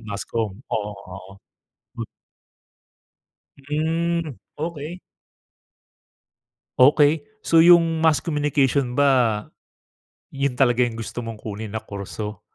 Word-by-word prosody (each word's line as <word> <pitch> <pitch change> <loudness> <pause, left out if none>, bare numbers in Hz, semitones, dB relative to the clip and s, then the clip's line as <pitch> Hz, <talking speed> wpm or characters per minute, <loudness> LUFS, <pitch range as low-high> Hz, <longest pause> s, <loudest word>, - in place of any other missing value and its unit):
mass 100 -1 -4
comm. 110 -4 -2 0.2
Oo, 105 -1 -2 0.2
oo. 95 0 -11 2.2
Mm. 160 +1 -2 0.2
Okey. 165 +2 -5 1.8
Okey, 145 +4 +5 0.2
so 165 -5 +4
yung 165 -2 +5
mass 160 -2 +4
communication 145 -4 0
ba 125 -7 +3 0.9
yun 135 -2 -1
talaga 120 -2 +3
yung 120 -2 +1
gusto 115 +1 -5
mong 115 -1 -6
kunin 110 0 -5
na 110 +2 -6
kurso? 105 0 -6
135 Hz, 95 wpm, -22 LUFS, 110-155 Hz, 2.2 s, Okey